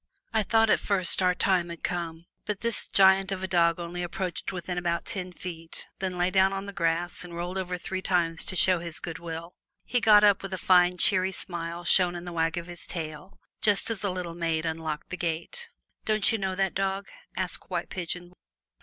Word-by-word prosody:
I 220 - +3
thought 225 +1 +3
at - - +4
first 190 -2 +2
our 180 -1 +3
time 180 -2 +2
had 170 -1 -8
come. 170 -1 -3 0.2
But 210 -2 -3
this 235 -1 0
giant 190 0 +5
of 190 -1 -3
a - - -1
dog 170 -2 +3
only 175 +1 -5
approached 175 +1 -3
within 180 -1 -4
about 170 -1 -1
ten 185 -1 -4
feet, 165 -2 -6
then 185 -2 -3
lay 180 +1 +1
down 190 0 +4
on 195 0 -4
the 200 - -7
grass 170 -1 -1
and 175 -1 -9
rolled 175 +2 -4
over 180 -1 -3
three 185 +2 -4
times 170 -3 +1
to 190 - -2
show 185 0 +3
his 170 -1 -6
goodwill. 165 0 -6 0.3
He 245 - +1
got 210 -2 +6
up 205 -2 +5
with 195 -1 -4
a - - -6
fine, 180 0 +4
cheery 185 +1 +4
smile 170 -2 -5
shown 175 +1 +4
in 175 0 -6
the 175 - -6
wag 165 +1 0
of 170 - -3
his 175 0 -8
tail, 160 +2 -6 0.2
just 205 +1 +3
as 215 -3 -1
a 200 - +1
little 180 -2 -4
maid 165 -1 -1
unlocked 160 -2 -4
the 185 - -3
gate. 175 - -3 0.3
"Don't 215 -2 +2
you 225 - 0
know 190 -1 -2
that 195 0 0
dog?" 195 0 -1 0.3
asked 185 -2 -2
White 175 -2 -3
Pigeon. 175 -1 -4
180 Hz, 210 wpm, -27 LUFS, 170-190 Hz, 0.3 s, got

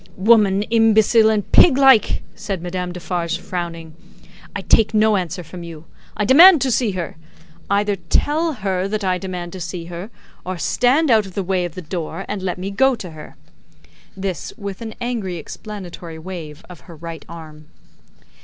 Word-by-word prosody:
"Woman 205 -1 +4
imbecile 225 0 +4
and 210 -2 -1
pig 295 -7 +6
like!" 265 -6 +4
said 200 -4 -5
Madame 180 0 -4
Defarge, 175 -1 -3
frowning. 165 -3 -6 0.6
"I 200 - -3
take 220 +2 +3
no 215 0 +4
answer 180 -2 -3
from 175 +2 -10
you. 165 -2 -10 0.3
I 210 - 0
demand 325 - +8
to 265 - +1
see 230 -3 +1
her. 175 -4 -5 0.5
Either 205 0 +1
tell 315 - +1
her 190 -5 -2
that 210 +1 -3
I 185 -1 0
demand 180 -2 -6
to 190 - -7
see 175 -1 -5
her, 175 +5 -7 0.3
or 185 0 -4
stand 260 - +2
out 215 -3 +4
of 185 - -13
the 195 - -1
way 185 -1 0
of 175 - -7
the 185 - -7
door 165 0 -5
and 205 -2 -4
let 185 -1 -3
me 190 +2 -5
go 265 +6 +3
to 185 -6 -8
her!" 155 -1 -12 0.8
This, 190 -2 -4
with 200 +1 -7
an 220 -1 -7
angry 235 -7 -3
explanatory 175 -3 -9
wave 160 -3 -8
of 180 -2 -12
her 170 - -10
right 165 +1 -8
arm. 155 -2 -11
190 Hz, 175 wpm, -20 LUFS, 175-220 Hz, 0.8 s, demand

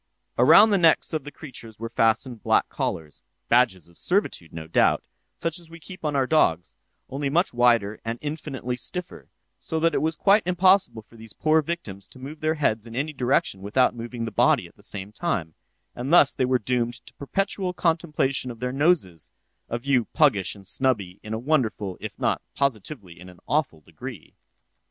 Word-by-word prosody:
Around 165 - +7
the 200 - +3
necks 165 -1 +3
of 155 -3 -2
the 145 - -7
creatures 120 -7 -10
were 115 - -5
fastened 115 +1 +1
black - - +2
collars, 75 -2 -4 0.3
(badges 115 -9 +3
of 85 - -13
servitude, 180 - -1
no 80 -1 -7
doubt,) 80 - +2 0.3
such 165 +1 -2
as 170 -2 -16
we 165 0 -12
keep 180 +3 -12
on 150 -2 -1
our 135 -1 +2
dogs, 90 - +1 0.3
only 140 +1 -3
much 170 +4 +1
wider 115 -4 +3
and 115 +1 -3
infinitely 145 -5 -4
stiffer, 180 +7 -7 0.3
so 160 - -3
that 165 +1 +2
it - - +1
was 160 0 0
quite 200 +5 +4
impossible 185 - +3
for 115 - -19
these 110 -1 -11
poor 155 0 +3
victims 110 - -6
to - - -15
move 140 +4 -9
their 155 +1 0
heads 115 -7 0
in 115 - -9
any 145 +4 -2
direction 125 -7 0
without 115 +7 +2
moving 120 0 -5
the 115 - -5
body 100 - +3
at - - -16
the - - -21
same 100 0 -7
time; 100 - -2 0.4
and 125 +4 -4
thus 150 -5 +6
they 130 - 0
were 130 0 +2
doomed 120 0 -1
to - - -16
perpetual 190 +5 -2
contemplation 160 -7 0
of 115 -2 -8
their 125 +1 -2
noses—a 135 - -1
view 125 -1 +1
puggish 105 - +2
and 100 -1 -15
snubby 100 -4 0
in 110 - -9
a 110 - -1
wonderful, 115 -8 0
if - - -7
not - - 0
positively 110 - -3
in 90 +1 -11
an 90 - -15
awful 135 - 0
degree. - - -10
130 Hz, 190 wpm, -25 LUFS, 110-155 Hz, 0.4 s, Around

